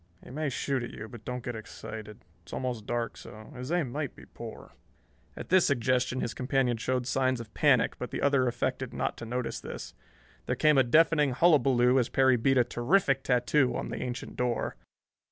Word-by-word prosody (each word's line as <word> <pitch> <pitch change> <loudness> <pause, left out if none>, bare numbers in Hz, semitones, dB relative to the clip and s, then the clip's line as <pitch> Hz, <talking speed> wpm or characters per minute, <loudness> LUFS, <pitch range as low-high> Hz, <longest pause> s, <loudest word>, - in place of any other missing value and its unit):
He - - -12
may 150 +2 -2
shoot 135 0 -1
at 120 - -5
you, 110 - -8
but 115 -2 -12
don't 125 -1 -4
get 120 -1 -4
excited. 110 -1 -9 0.2
It's - - -14
almost 120 -5 -3
dark, 120 -1 -2
so 110 +5 -11
his 125 +4 -6
aim 170 -8 0
might 145 0 -4
be - - -13
poor." - - -10 0.7
At - - -7
this 185 -1 +5
suggestion 130 -1 +1
his 115 - -2
companion 130 -2 0
showed 125 +2 -1
signs 130 -1 +1
of 115 -2 -9
panic, 130 -6 +3
but 125 - -4
the - - -4
other 140 -3 +3
affected 130 +1 -2
not - - -1
to 115 - -7
notice 125 +1 -3
this. - - -8 0.5
There - - 0
came 150 -2 +4
a - - +6
deafening 150 +1 +3
hullaballoo 135 -6 +4
as 120 - 0
Perry 130 -1 +4
beat 135 +3 +2
a 125 - +6
terrific 135 +3 +1
tattoo 125 +1 +2
on - - -4
the - - -5
ancient 125 -1 -5
door. 125 -1 -1
125 Hz, 195 wpm, -29 LUFS, 120-135 Hz, 0.7 s, a